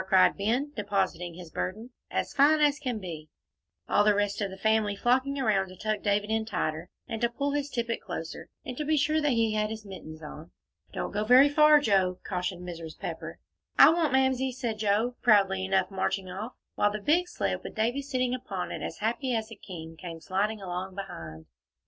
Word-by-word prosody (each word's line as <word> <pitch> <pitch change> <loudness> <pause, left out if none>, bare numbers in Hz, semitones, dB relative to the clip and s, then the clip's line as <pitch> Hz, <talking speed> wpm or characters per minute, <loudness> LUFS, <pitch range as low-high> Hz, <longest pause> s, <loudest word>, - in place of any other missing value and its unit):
cried 190 -1 +5
Ben, 240 +8 0
depositing 190 -5 -1
his 175 -2 -10
burden, 220 +7 -4 0.2
"as - - -2
fine 295 +3 +5
as 290 -1 +3
can 250 -5 -2
be," 165 -6 -7 0.6
all 205 - +4
the 210 0 +4
rest 205 0 0
of 200 - 0
the 190 - -9
family 220 0 +2
flocking 260 +6 +1
around 210 -7 +2
to 185 - -12
tuck 215 +2 -2
David 205 +1 0
in 220 0 +1
tighter, 170 -6 -3 0.2
and 225 - -4
to 235 - +3
pull 280 +4 -2
his 290 0 -1
tippet 235 -3 -2
closer, 165 -3 -6 0.2
and 250 - -5
to 300 - -1
be 310 +1 +1
sure 305 +2 +2
that 295 -3 +2
he 225 -2 +2
had 215 0 0
his 220 -1 -7
mittens 160 -5 -9
on. 155 +2 -9 0.4
"Don't - - -4
go 210 +1 -1
very 255 +5 +7
far, 300 +1 +6
Joe," 190 -8 +2
cautioned 180 -1 -3
Mrs. 165 -2 -7
Pepper. - - -6 0.4
"I - - +9
won't, 330 -2 +1
Mamsie," 265 0 +2
said 235 -4 -3
Joe, 220 +4 +1
proudly 195 -4 +4
enough, 190 0 +1
marching 190 0 -1
off, 210 +6 -6 0.2
while 205 - +2
the 210 - -4
big 330 - +2
sled, - - -2
with - - -8
Davie 235 +5 0
sitting 255 -3 -1
upon 200 -8 -4
it - - -5
as - - -5
happy 245 +2 0
as 220 0 -3
a - - -7
king, 165 -5 -9
came 165 0 -8
sliding 205 +5 -1
along 185 0 -5
behind. 80 - -7
215 Hz, 205 wpm, -28 LUFS, 190-255 Hz, 0.6 s, I